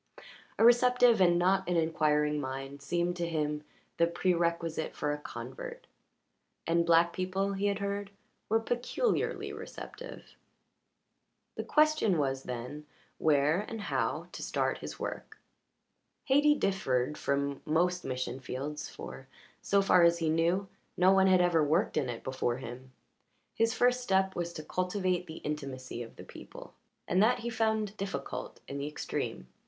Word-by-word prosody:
A 225 Hz, -, +5 dB
receptive 245 Hz, -2 st, +5 dB
and 175 Hz, -1 st, +5 dB
not 190 Hz, +1 st, +2 dB
an 175 Hz, -, +2 dB
inquiring 150 Hz, -2 st, +2 dB
mind 135 Hz, +1 st, -6 dB
seemed 175 Hz, +5 st, -1 dB
to 170 Hz, -1 st, -2 dB
him 150 Hz, -2 st, -1 dB, 0.4 s
the 170 Hz, -, +4 dB
prerequisite 170 Hz, -2 st, 0 dB
for 150 Hz, -, -1 dB
a 150 Hz, -, -3 dB
convert. -, -, -8 dB, 0.8 s
And 170 Hz, 0 st, +2 dB
black 170 Hz, +1 st, +5 dB
people, 190 Hz, +2 st, -1 dB
he 200 Hz, +1 st, 0 dB
had 200 Hz, -1 st, 0 dB
heard, 200 Hz, 0 st, -3 dB, 0.4 s
were 225 Hz, +1 st, +4 dB
peculiarly 245 Hz, -, -1 dB
receptive. -, -, -9 dB, 1.2 s
The -, -, -3 dB
question 305 Hz, -, +3 dB
was, 135 Hz, -2 st, 0 dB
then, 125 Hz, +4 st, -6 dB, 0.3 s
where 150 Hz, +2 st, +3 dB
and 225 Hz, +1 st, -6 dB
how 145 Hz, -, -1 dB
to -, -, -8 dB
start -, -, -1 dB
his -, -, -7 dB
work. -, -, -6 dB, 0.9 s
Hayti 295 Hz, +2 st, +5 dB
differed 150 Hz, -, 0 dB
from 140 Hz, -1 st, -1 dB
most 175 Hz, +3 st, +1 dB
mission 130 Hz, 0 st, -3 dB
fields, 135 Hz, +3 st, -5 dB
for, 135 Hz, -, -9 dB, 0.3 s
so 200 Hz, 0 st, +2 dB
far 180 Hz, -2 st, +5 dB
as 170 Hz, 0 st, +5 dB
he 165 Hz, -2 st, 0 dB
knew, 170 Hz, +5 st, +1 dB, 0.3 s
no 185 Hz, +1 st, +5 dB
one 190 Hz, 0 st, +5 dB
had 185 Hz, -1 st, +5 dB
ever 175 Hz, -3 st, +3 dB
worked 155 Hz, +6 st, +1 dB
in 140 Hz, -5 st, 0 dB
it 120 Hz, -, -5 dB
before 130 Hz, -2 st, -1 dB
him. 130 Hz, +1 st, -9 dB, 0.7 s
The 225 Hz, -, +5 dB
first 250 Hz, +2 st, +2 dB
step 190 Hz, -4 st, +1 dB
was 170 Hz, 0 st, -2 dB
to 155 Hz, -, -7 dB
cultivate 180 Hz, 0 st, -1 dB
the 160 Hz, -, -8 dB
intimacy 135 Hz, -5 st, -5 dB
of 115 Hz, -, -9 dB
the -, -, -10 dB
people, -, -, -12 dB, 0.3 s
and 185 Hz, -, +3 dB
that 235 Hz, +4 st, +4 dB
he 235 Hz, +1 st, -3 dB
found 220 Hz, -2 st, 0 dB
difficult 195 Hz, -8 st, -5 dB
in 140 Hz, -, -5 dB
the 140 Hz, -, -3 dB
extreme. 150 Hz, -, -4 dB
170 Hz, 150 wpm, -31 LUFS, 145-195 Hz, 1.2 s, A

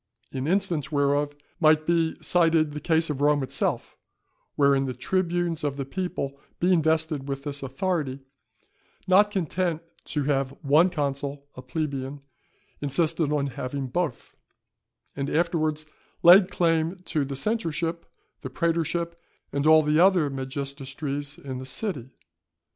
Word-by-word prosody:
In 135 Hz, +1 st, -3 dB
instance 170 Hz, -5 st, 0 dB
whereof 145 Hz, 0 st, +1 dB, 0.2 s
might 155 Hz, -2 st, +4 dB
be 165 Hz, -1 st, +1 dB
cited 165 Hz, -3 st, +3 dB
the 150 Hz, -, -5 dB
case 160 Hz, +1 st, +1 dB
of 140 Hz, -1 st, -4 dB
Rome 145 Hz, -1 st, +3 dB
itself, 130 Hz, -, -2 dB, 0.6 s
wherein 140 Hz, -1 st, +3 dB
the 130 Hz, -, -4 dB
tribunes 175 Hz, +3 st, -1 dB
of 140 Hz, -2 st, -1 dB
the 135 Hz, -, -3 dB
people 140 Hz, -4 st, -4 dB, 0.2 s
being 175 Hz, -1 st, +3 dB
vested 160 Hz, -3 st, 0 dB
with 135 Hz, 0 st, -4 dB
this 145 Hz, -1 st, -4 dB
authority, 135 Hz, 0 st, -2 dB, 0.8 s
not 200 Hz, +3 st, +5 dB
content 175 Hz, -3 st, -1 dB, 0.2 s
to 150 Hz, -, -2 dB
have 135 Hz, -1 st, 0 dB
one 155 Hz, +6 st, +5 dB
consul 140 Hz, -3 st, -3 dB
a 130 Hz, -, -8 dB
plebeian, 140 Hz, 0 st, -4 dB, 0.6 s
insisted 155 Hz, +2 st, +1 dB
on 145 Hz, -2 st, +1 dB
having 135 Hz, 0 st, -4 dB
both; 160 Hz, -2 st, -3 dB, 0.8 s
and 140 Hz, 0 st, -2 dB
afterwards 155 Hz, -2 st, 0 dB, 0.4 s
laid 180 Hz, +2 st, +8 dB
claim 165 Hz, -1 st, +1 dB
to 150 Hz, -, 0 dB
the 135 Hz, 0 st, -4 dB
censorship, 165 Hz, -, -2 dB, 0.3 s
the 130 Hz, -, -5 dB
prætorship 170 Hz, +3 st, -1 dB, 0.4 s
and 140 Hz, +2 st, 0 dB
all 155 Hz, 0 st, +7 dB
the 150 Hz, +1 st, +2 dB
other 175 Hz, -5 st, +4 dB
magistracies 140 Hz, +1 st, -5 dB
in 130 Hz, -2 st, -6 dB
the -, -, -6 dB
city. 135 Hz, -, -4 dB
150 Hz, 135 wpm, -26 LUFS, 140-170 Hz, 0.8 s, laid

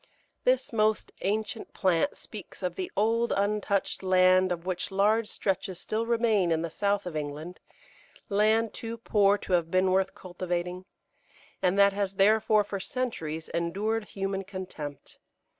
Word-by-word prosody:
This -, -, +2 dB
most 215 Hz, -1 st, +1 dB
ancient 210 Hz, +2 st, -2 dB
plant 185 Hz, -, +1 dB
speaks -, -, -11 dB
of -, -, -1 dB
the 370 Hz, -2 st, -5 dB
old, 230 Hz, +3 st, +2 dB
untouched 200 Hz, 0 st, 0 dB
land 185 Hz, 0 st, +4 dB
of 175 Hz, 0 st, -3 dB
which 185 Hz, -1 st, -2 dB
large 210 Hz, +3 st, +2 dB
stretches 190 Hz, -3 st, -2 dB
still 225 Hz, +1 st, -2 dB
remain 225 Hz, -6 st, +2 dB
in 160 Hz, 0 st, +1 dB
the 170 Hz, -, -4 dB
south 200 Hz, +2 st, 0 dB
of 175 Hz, -3 st, -5 dB
England 155 Hz, +4 st, -5 dB, 0.7 s
land 215 Hz, +2 st, +2 dB
too 230 Hz, 0 st, -6 dB
poor 205 Hz, -3 st, +3 dB
to 190 Hz, -, -5 dB
have 170 Hz, -2 st, +2 dB
been 185 Hz, +1 st, +2 dB
worth 190 Hz, +1 st, +1 dB
cultivating, 180 Hz, 0 st, -4 dB, 0.8 s
and 185 Hz, +1 st, +2 dB
that 200 Hz, 0 st, +6 dB
has 195 Hz, -1 st, -2 dB
therefore 215 Hz, +2 st, +4 dB
for 200 Hz, -1 st, -5 dB
centuries 165 Hz, -10 st, -4 dB
endured 205 Hz, +6 st, -1 dB
human 195 Hz, -1 st, -3 dB
contempt. 185 Hz, -7 st, -8 dB
195 Hz, 145 wpm, -28 LUFS, 180-215 Hz, 0.8 s, that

